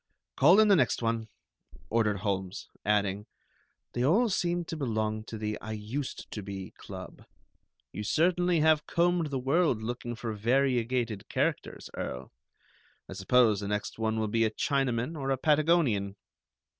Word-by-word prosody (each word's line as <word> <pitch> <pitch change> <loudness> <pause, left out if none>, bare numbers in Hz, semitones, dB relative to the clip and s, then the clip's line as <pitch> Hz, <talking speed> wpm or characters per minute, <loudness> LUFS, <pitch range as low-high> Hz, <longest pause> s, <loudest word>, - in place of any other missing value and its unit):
Call 200 - +6
in 215 - +6
the 200 - +6
next 150 - +1
one," 115 -1 -1 0.6
ordered 105 -4 +1
Holmes; 95 -2 -3
adding: 105 -1 0 0.7
"They 120 - -1
all 210 - +3
seem 175 -3 0
to 165 - -5
belong 110 -6 -2
to 110 - -7
the 105 0 -3
'I 110 - -5
used 110 +6 -5
to 105 - -5
be' 95 -2 -7
club. - - -10 0.7
You 105 - -5
certainly 175 - +2
have 155 -1 +3
combed 175 -1 +2
the 140 - -2
world 135 -2 +1
looking 120 +1 -4
for 115 -1 -4
variegated 120 -1 0
characters, - - -2
Earl. 65 +1 -5 0.8
I - - -8
suppose 105 +2 +3
the 100 - -4
next 105 +2 -3
one 110 0 0
will 110 - 0
be 115 +2 +1
a 110 - +3
Chinaman 130 +3 -1
or 135 -3 -3
a 135 - +1
Patagonian." 150 - +2
115 Hz, 155 wpm, -29 LUFS, 105-150 Hz, 0.8 s, Call